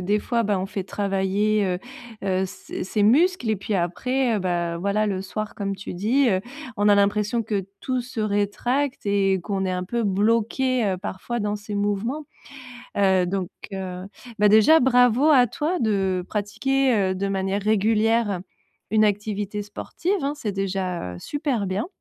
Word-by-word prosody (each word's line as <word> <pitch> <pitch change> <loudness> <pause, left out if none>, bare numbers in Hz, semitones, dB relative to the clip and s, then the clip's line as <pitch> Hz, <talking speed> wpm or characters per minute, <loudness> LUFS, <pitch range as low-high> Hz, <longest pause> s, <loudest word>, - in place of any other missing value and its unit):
des 200 +4 +1
fois 235 +2 0
bah, 205 -2 0
on 185 - -2
fait 195 0 -4
travailler, 200 +1 0
heu 180 -1 -1 0.5
heu, 190 0 +1
ses - - -7
ses 205 +2 -1
muscles 280 - +3
et 215 - +1
puis 205 +2 -3
après, 240 +8 0
heu, - - 0
bah, 175 -2 -1
voilà 200 +3 0
le 190 -2 -2
soir 215 +2 -5
comme 200 -1 -3
tu 195 - -7
dis, 235 +8 +2
heu, 185 -3 +2 0.4
on 205 0 +3
a 205 - +7
l'impression 210 +3 +2
que 200 -3 -2
tout 255 -1 -1
se 240 -2 -6
rétracte, 215 +6 -1
et 195 -2 +2
qu'on 190 +2 -2
est 185 - -1
un 180 0 -2
peu 235 +5 -2
bloqué, 230 +5 +1
heu, 190 -2 0
parfois 205 +5 -4
dans 210 0 -1
ces 210 0 -7
mouvements, 205 +9 -1 0.7
heu, 190 -2 +3
donc 185 0 -2 0.2
heu, 185 -2 -5 0.4
bah, 210 0 +5
déjà 220 +10 +6
bravo 250 +2 +4
à 255 -5 +6
toi 310 - -2
de 195 -5 0
pratiquer, 255 +6 +1 0.2
heu, - - -3
de 195 +1 -2
manière 195 +1 -1
régulière 215 -1 +2 0.5
une 215 0 +4
activité 205 0 -2
sportive, 335 - -4
hein. 280 +2 -1
C'est 215 -7 -3
déjà, 185 - -3
heu, - - -8
super 265 - -2
bien 190 +3 -2
205 Hz, 175 wpm, -24 LUFS, 195-230 Hz, 0.7 s, a